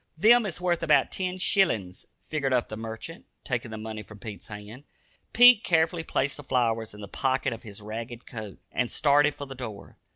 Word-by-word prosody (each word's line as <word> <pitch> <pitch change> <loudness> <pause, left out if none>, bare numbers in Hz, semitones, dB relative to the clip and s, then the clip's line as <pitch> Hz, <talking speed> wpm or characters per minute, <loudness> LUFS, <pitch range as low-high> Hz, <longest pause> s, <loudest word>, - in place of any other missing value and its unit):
"Them 225 +5 +6
is 175 - -4
wurth 175 -2 0
about 160 -2 +3
ten 185 -1 -2
shillins," 115 - +1 0.2
figured 140 -4 -1
up 125 -2 +1
the 110 - -5
merchant, 115 +9 -8 0.2
taking 125 -3 -3
the 110 - -6
money 110 0 -6
from 105 +1 -13
Pete's 105 0 -8
hand. 105 +5 -10 0.5
Pete 245 -2 +8
carefully 165 0 +2
placed 140 -3 -1
the 145 - -9
flowers 115 -5 0
in 105 - -11
the 100 - -7
pocket 130 +3 0
of 115 - -9
his 105 -2 -10
ragged 115 +3 -7
coat, 110 -4 -8
and 125 -1 -1
started 145 0 +3
for 145 - -6
the 135 - -8
door. 115 -6 -9
125 Hz, 195 wpm, -27 LUFS, 110-160 Hz, 0.5 s, Pete